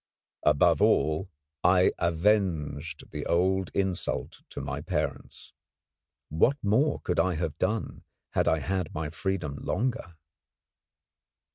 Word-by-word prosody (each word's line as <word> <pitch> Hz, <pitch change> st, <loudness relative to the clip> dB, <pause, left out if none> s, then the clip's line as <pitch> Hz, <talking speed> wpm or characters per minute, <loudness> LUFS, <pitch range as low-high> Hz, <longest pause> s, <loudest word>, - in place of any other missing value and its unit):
Above 75 Hz, -1 st, +4 dB
all, 80 Hz, +6 st, +2 dB, 0.3 s
I 90 Hz, 0 st, +5 dB
avenged 85 Hz, -5 st, 0 dB
the 75 Hz, +1 st, -4 dB
old 95 Hz, +1 st, +2 dB
insult 95 Hz, -3 st, -2 dB
to -, -, -7 dB
my -, -, -4 dB
parents. -, -, -4 dB, 0.8 s
What 115 Hz, -, +3 dB
more 130 Hz, +9 st, +2 dB
could -, -, -1 dB
I 95 Hz, -2 st, +2 dB
have 80 Hz, -2 st, -2 dB
done 110 Hz, -7 st, -2 dB, 0.3 s
had -, -, +1 dB
I 80 Hz, -, +4 dB
had 90 Hz, +1 st, -2 dB
my 75 Hz, 0 st, -3 dB
freedom 85 Hz, -6 st, -3 dB
longer? 115 Hz, -, -2 dB
90 Hz, 115 wpm, -28 LUFS, 80-95 Hz, 0.8 s, I